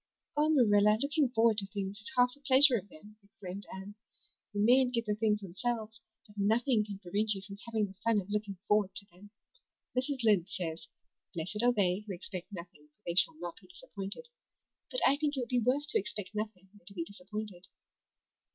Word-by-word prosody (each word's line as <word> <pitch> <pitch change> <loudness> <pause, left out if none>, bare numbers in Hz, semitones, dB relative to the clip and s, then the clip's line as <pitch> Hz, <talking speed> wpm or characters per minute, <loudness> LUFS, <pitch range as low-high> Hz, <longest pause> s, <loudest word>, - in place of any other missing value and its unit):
"Oh, 300 +1 +3
Marilla, 210 -7 +5
looking 285 +1 +1
forward 225 -2 +3
to 195 - -4
things 200 0 -4
is 220 +8 -9
half 250 0 +5
the 285 - -18
pleasure 275 -1 +7
of 200 -3 -3
them," 210 +7 -15
exclaimed 200 -1 -9
Anne. 190 +2 -8 0.6
"You 205 0 +1
mayn't 250 +1 +5
get 230 -1 0
the 210 - 0
things 210 0 +1
themselves; 220 +4 -3 0.2
but 205 -1 -12
nothing 220 +3 +3
can 205 -2 -7
prevent 205 +3 0
you 195 - -7
from 200 0 -10
having 220 -2 +1
the 190 - -10
fun 230 -2 +3
of 190 - -6
looking 205 -2 -2
forward 210 -2 +2
to 200 - -4
them. 190 +4 -16 0.7
Mrs. 260 0 -1
Lynde 205 -5 +3
says, 165 -3 -4 0.5
'Blessed 180 +6 -2
are 245 +1 +5
they 190 -5 +2
who 195 - -4
expect 180 +2 -6
nothing 170 -5 -10
for 150 - -44
they 170 - -1
shall 170 -3 +4
not 175 0 -6
be - - -18
disappointed.' 360 - -7 0.6
But - - 0
I 280 - +5
think 295 -1 -1
it - - +1
would 240 - -5
be 250 - +2
worse 265 +5 +2
to - - +3
expect 205 -2 -6
nothing 210 -3 -5
than 205 - -20
to 200 - -8
be 170 - -2
disappointed." 200 0 -7
210 Hz, 205 wpm, -32 LUFS, 195-240 Hz, 0.7 s, pleasure